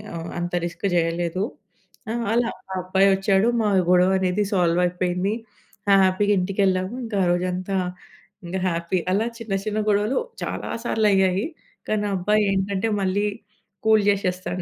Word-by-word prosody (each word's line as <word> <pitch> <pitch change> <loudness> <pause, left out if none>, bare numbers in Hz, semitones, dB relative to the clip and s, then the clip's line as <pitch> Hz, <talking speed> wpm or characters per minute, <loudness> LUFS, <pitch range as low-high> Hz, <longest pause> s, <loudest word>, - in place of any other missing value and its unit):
ఆహ్, 165 0 -5
అంత 175 0 -4
రిస్క్ 170 +3 -6
చేయలేదు. 170 +2 0 0.7
ఆ! - - -1 0.2
అలా 235 0 +2 0.2
ఆ - - -2
అబ్బాయి 190 +2 +3
ఒచ్చాడు. 195 +2 +2 0.2
మా 210 - +2 0.2
గొడవ 180 +1 +5
అనేది 190 +2 +1
సాల్వ్ 175 -1 +2
అయిపోయింది. 180 +2 -1 0.6
ఆ! - - +7
హ్యాపీగా 205 +2 +2
ఇంటికెళ్ళాము. 190 +1 0
ఇంకా 215 -3 -3
ఆరోజంతా 180 +2 -1 0.7
ఇంగా 185 +2 -3
హ్యాపీ 170 +1 -1
అలా 205 +4 +2
చిన్న 225 -4 -5
చిన్న 215 0 -2
గొడవలు 210 +5 +2 0.3
చాలా - - -4
సార్లు 220 -3 +1
అయ్యాయి. 190 +1 +2 0.4
కానీ 215 -1 +1
ఆ - - -1
అబ్బాయి 210 +4 +2
ఏంటంటే, 195 +2 0
మళ్ళీ 195 +2 +1 0.6
కూల్ 220 -1 +5
జేసేస్తాడు 185 -2 -1
190 Hz, 145 wpm, -23 LUFS, 180-205 Hz, 0.7 s, ఆ